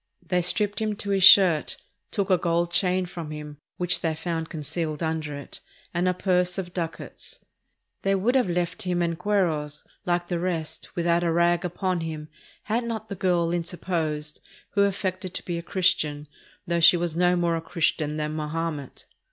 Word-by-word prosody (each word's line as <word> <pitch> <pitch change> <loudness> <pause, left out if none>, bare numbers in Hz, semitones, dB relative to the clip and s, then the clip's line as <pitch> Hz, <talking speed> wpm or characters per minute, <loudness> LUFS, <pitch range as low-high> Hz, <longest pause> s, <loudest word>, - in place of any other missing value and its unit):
They 180 +2 +1
stripped 205 +4 +1
him 215 -1 0
to 200 0 -4
his 195 -1 +2
shirt, 180 -5 +7 0.3
took 200 -2 -1
a 185 - +6
gold 170 0 +1
chain 185 0 +2
from 170 -3 -7
him, 150 -1 -7 0.2
which 180 -1 0
they 160 -1 0
found 165 0 -3
concealed 155 0 -3
under 160 -2 -2
it, 140 - -9 0.3
and 175 +2 +1
a 180 - +3
purse 180 -1 +1
of 180 -2 -4
ducats. 180 - -6 0.6
They 195 0 +2
would 210 +6 +1
have 255 -7 +3
left 175 0 -1
him 175 -1 0
en 170 -1 0
cueros, 165 -6 0 0.2
like 175 0 +1
the 175 -1 -1
rest, 170 -3 -3
without 170 0 +2
a 170 - +2
rag 170 +1 +3
upon 180 +1 -1
him, 155 -2 -5 0.3
had 225 +3 0
not 225 -2 -4
the 200 - -4
girl 175 -2 +1
inter 175 0 -3
posed, 155 -4 -2 0.3
who 200 -1 +4
affected 185 -2 -2
to - - -4
be 170 -1 -2
a - - -5
Christian, 155 -5 0 0.4
"though 170 0 0
she 165 +2 +8
was 170 -2 -2
no 180 +1 +3
more 170 -1 +1
a 165 - -2
Christian 160 -3 0
than 150 0 -2
Mahomet." 155 -2 -4
175 Hz, 185 wpm, -26 LUFS, 160-185 Hz, 0.6 s, she